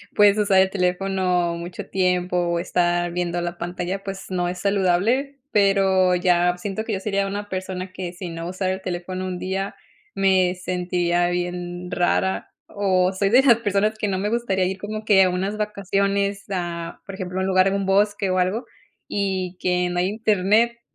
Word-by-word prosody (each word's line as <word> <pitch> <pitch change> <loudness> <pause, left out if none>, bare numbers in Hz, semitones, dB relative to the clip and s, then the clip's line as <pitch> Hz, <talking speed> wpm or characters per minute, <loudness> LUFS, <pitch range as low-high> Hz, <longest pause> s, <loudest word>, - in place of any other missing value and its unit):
puedes 205 0 +6
usar 200 -2 +4
el 190 - +2
teléfono 180 -2 0
mucho 175 +3 -7
tiempo, 180 -1 0
o 170 -1 +1
estar 175 0 0
viendo 175 0 -2
la 175 0 -4
pantalla, 180 +3 -4
pues 195 -1 -6
no 180 -1 -1
es 180 0 -5
saludable, 200 +9 +1
pero 195 -2 +3
ya 180 0 +2
siento 200 +3 -4
que 225 - -3
yo 195 - -1
sería 200 0 0
una 205 +1 -4
persona 185 -1 -5
que, 180 -2 -5
si 180 0 -7
no 165 0 -5
usara 185 0 -1
el 190 - -6
teléfono 185 +1 -4
un 180 -1 -4
día, 190 +2 -3 0.4
me 185 -2 +3
sentiría 175 -1 0
bien 175 0 -4
rara. 190 +1 0 0.2
O 190 -2 +1
soy 195 +1 +1
de 245 +5 +6
esas 260 -4 +6
personas 210 -1 0
que 215 - -1
no 190 - -1
me 200 +2 -1
gustaría 210 -5 0
ir 190 +1 -2
como 215 +2 -5
que 195 -3 +6
a 185 - +3
unas 190 +3 -2
vacaciones 200 -1 -1
a 170 -2 -4
por 195 - -7
ejemplo, 185 -1 -4
un 190 - 0
lugar 185 0 +4
en 195 - +1
un 200 -1 -1
bosque 200 0 +2
o 185 - +1
algo 190 +7 0 0.4
y 190 -2 -2
que 180 0 +1
no 175 0 -1
hay 180 - +2
internet. 215 +2 +2
185 Hz, 185 wpm, -23 LUFS, 180-200 Hz, 0.4 s, puedes